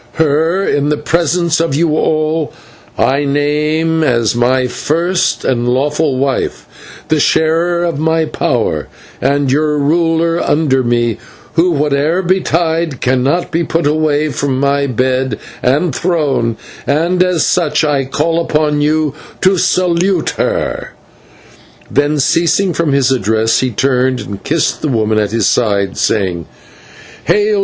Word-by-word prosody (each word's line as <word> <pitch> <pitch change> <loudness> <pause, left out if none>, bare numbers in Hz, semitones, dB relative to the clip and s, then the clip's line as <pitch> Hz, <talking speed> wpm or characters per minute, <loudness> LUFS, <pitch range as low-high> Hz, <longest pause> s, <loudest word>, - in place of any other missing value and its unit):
Her, 160 +4 +1
in 145 0 +1
the 150 - 0
presence 170 +1 0
of 165 -4 0
you 155 0 +1
all, 155 0 0 0.4
I 140 +2 +1
name 150 +3 0
as 115 -6 +1
my 125 +2 +2
first 170 +8 -1
and 120 -1 0
lawful 145 +2 0
wife, 135 0 -2 0.4
the 155 0 +2
sharer 165 +4 +1
of 170 -4 -2
my 160 +1 +1
power, - - -1 0.3
and 140 0 +1
your 150 +1 +1
ruler 165 +3 +1
under 145 -3 +1
me, 120 -2 0 0.3
who, 170 +2 +3
whate'er 150 +5 0
betide, 170 -4 0
cannot 130 +7 0
be 170 +1 0
put 165 0 -1
away 150 0 +1
from 135 0 -2
my 140 0 +1
bed 130 -1 -1 0.2
and 145 +5 +1
throne, 140 -9 0 0.3
and 170 +5 +1
as 180 -3 +1
such 155 -3 +1
I 145 -3 +1
call 165 +5 0
upon 150 -2 0
you 150 -1 +1 0.3
to 190 -1 +3
salute 180 0 +1
her." - - -3 1.0
Then, 145 +1 +1
ceasing 170 +6 +1
from 160 -1 0
his 135 -1 +2
address, 110 -2 +1
he 130 - 0
turned 130 +2 0
and 100 -1 -8
kissed 160 +2 0
the - - -1
woman 110 -4 +1
at 105 -1 0
his 115 -2 0
side, 100 -5 +1
saying: 90 -6 -1 0.8
"Hail! 210 0 +2
150 Hz, 135 wpm, -14 LUFS, 130-165 Hz, 1.0 s, who